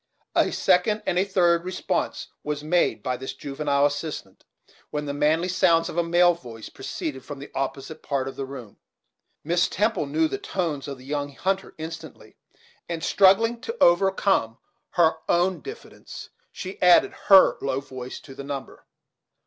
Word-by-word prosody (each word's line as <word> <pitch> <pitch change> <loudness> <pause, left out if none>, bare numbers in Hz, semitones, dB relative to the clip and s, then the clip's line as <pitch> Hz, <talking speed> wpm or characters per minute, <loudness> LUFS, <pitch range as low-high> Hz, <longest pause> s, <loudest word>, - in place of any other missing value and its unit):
A - - +3
second 195 +3 +2
and 180 - +1
third 175 -3 +3
response 185 +1 -3
was 150 0 -3
made 175 +3 +1
by 125 -1 -1
this 130 +1 -6
juvenile 140 0 0
assistant, 145 - -4 0.4
when 150 0 -3
the 140 - -3
manly 155 +4 +2
sounds 175 -2 +3
of - - -7
a - - +3
male 175 +1 +4
voice 120 -9 -10
proceeded 130 0 -6
from 145 - -8
the 140 +2 -10
opposite 135 +3 -4
part 135 -2 -2
of 135 - -6
the 135 - -5
room, 130 -6 -10 0.7
Miss 175 +3 +2
Temple 210 -6 0
knew 160 +3 +1
the 200 - -4
tones 165 -9 -3
of 140 -1 -6
the 130 - -15
young 145 0 -3
hunter 195 +3 -2
instantly, 160 +1 -9 0.5
and 165 -1 -4
struggling 225 +5 +4
to 460 - -5
overcome 175 - +3 0.4
her 165 -2 +3
own 180 +2 +2
diffidence 430 +3 -10 0.2
she 185 +1 -8
added 180 -1 +6
her 195 -1 +7
low 135 -1 -1
voice 130 -2 -8
to 135 - -12
the 140 - -8
number. 140 -1 -7
160 Hz, 160 wpm, -25 LUFS, 140-180 Hz, 0.7 s, her